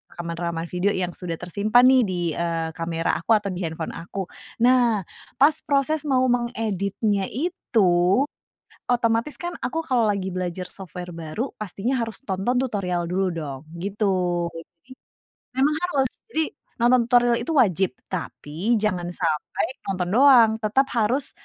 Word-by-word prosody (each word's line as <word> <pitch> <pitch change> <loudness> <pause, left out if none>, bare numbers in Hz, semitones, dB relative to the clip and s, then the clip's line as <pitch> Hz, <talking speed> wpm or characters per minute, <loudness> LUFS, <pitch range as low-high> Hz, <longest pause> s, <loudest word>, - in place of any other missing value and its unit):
rekaman-rekaman 170 -1 -3
video 180 +3 +1
yang 180 -1 -1
sudah 175 -3 -4
tersimpan 210 +7 +3
nih 260 0 +6
di, 185 -2 -2 0.2
eee, 165 -1 -1
kamera 165 0 -1
aku 220 +7 +3
atau 205 -2 0
di 180 0 -5
handphone 160 0 -5
aku. 180 +3 -5 0.4
Nah, 240 -5 +4 0.4
pas 290 +3 +6
proses 285 +2 +1
mau 260 -2 +3
mengeditnya 215 -4 -1
itu, 220 - +2 0.7
otomatis 235 +2 +1
kan 345 0 -4
aku 325 +6 -1
kalau 245 -5 +3
lagi 195 -2 -1
belajar 180 0 -3
software 180 -1 -8
baru, 165 - -4
pastinya 215 +5 -2
harus 225 -1 -5
tonton 195 +5 0
tutorial 180 -8 -2
dulu 190 +1 +1
dong 145 -5 -5 0.2
gitu, 205 +3 -2 0.5
jadi 165 +7 -13 0.7
memang 280 +3 +3
harus, 280 -7 +1 0.2
jadi 320 -6 +1 0.4
nonton 245 +1 +5
tutorial 240 -1 +4
itu 325 - -3
wajib, 190 - +3 0.2
tapi 180 +3 -2
jangan 185 -5 0
sampai 165 +3 -1 0.2
nonton 185 -2 -1
doang, 250 -3 +7
tetap 240 +6 +2
harus 245 +5 +1
205 Hz, 140 wpm, -24 LUFS, 175-245 Hz, 0.7 s, doang